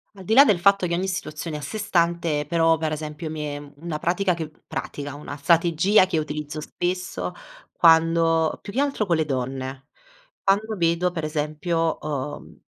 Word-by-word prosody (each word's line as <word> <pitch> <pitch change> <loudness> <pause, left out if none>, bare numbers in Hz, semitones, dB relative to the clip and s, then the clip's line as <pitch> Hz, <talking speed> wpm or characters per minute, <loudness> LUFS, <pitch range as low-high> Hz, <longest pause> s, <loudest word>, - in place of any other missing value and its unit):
Al 190 - -11
di 220 - 0
là 275 +3 +9
del 195 -8 +3
fatto 195 -1 +4
che 170 - -2
ogni 190 +2 -1
situazione 155 -4 -4
è - - -6
a - - -9
sé 215 - -5
stante, 170 -7 +1
però, 165 -1 +3
per 160 0 -2
esempio 155 +1 -5
mi 155 0 -5
è 145 -1 -6
una 155 0 -5
pratica 180 +2 +1
che 160 -2 -5 0.2
pratica, 145 -1 -5
una 145 0 -7
strategia 170 +6 +4
che 165 - -1
utilizzo 150 0 -4
spesso 180 +3 -3 0.4
quando 165 -1 +4
più 200 - -9
che 270 - +1
altro 275 -7 0
con 175 - +1
le 160 -1 +1
donne, 130 0 -4 0.6
quando 210 +3 +1
vedo 170 +1 +1
per 165 -3 -4
esempio, 155 +2 -1
uhm 140 - -5
165 Hz, 180 wpm, -24 LUFS, 150-180 Hz, 0.6 s, là